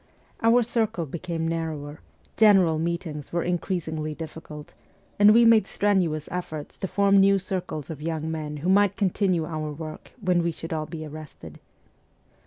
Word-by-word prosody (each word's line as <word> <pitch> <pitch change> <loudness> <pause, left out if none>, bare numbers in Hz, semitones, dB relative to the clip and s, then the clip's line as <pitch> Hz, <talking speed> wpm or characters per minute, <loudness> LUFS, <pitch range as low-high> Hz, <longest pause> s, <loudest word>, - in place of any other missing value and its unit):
Our 235 +2 +5
circle 220 -7 -1
became 165 +2 -4
narrower, 155 -3 -4 0.4
general 190 -7 +5
meetings 165 -3 -4
were 170 0 0
increasingly 160 -3 -2
difficult, 155 -2 -9 0.5
and 205 +1 +8
we 235 +2 +6
made 230 -1 +5
strenuous 180 -7 0
efforts 160 -4 -5
to 190 - -2
form 200 +1 +3
new 195 0 +5
circles 185 -6 -4
of 150 -2 -8
young 160 0 -3
men 150 -2 -4
who - - +2
might 200 0 +4
continue 185 -4 +1
our 155 -2 -4
work 155 +1 -8
when 180 -4 +2
we 170 0 0
should 165 0 -7
all 155 -1 -3
be 160 -2 -7
arrested. 155 0 -10
165 Hz, 155 wpm, -25 LUFS, 155-195 Hz, 0.5 s, and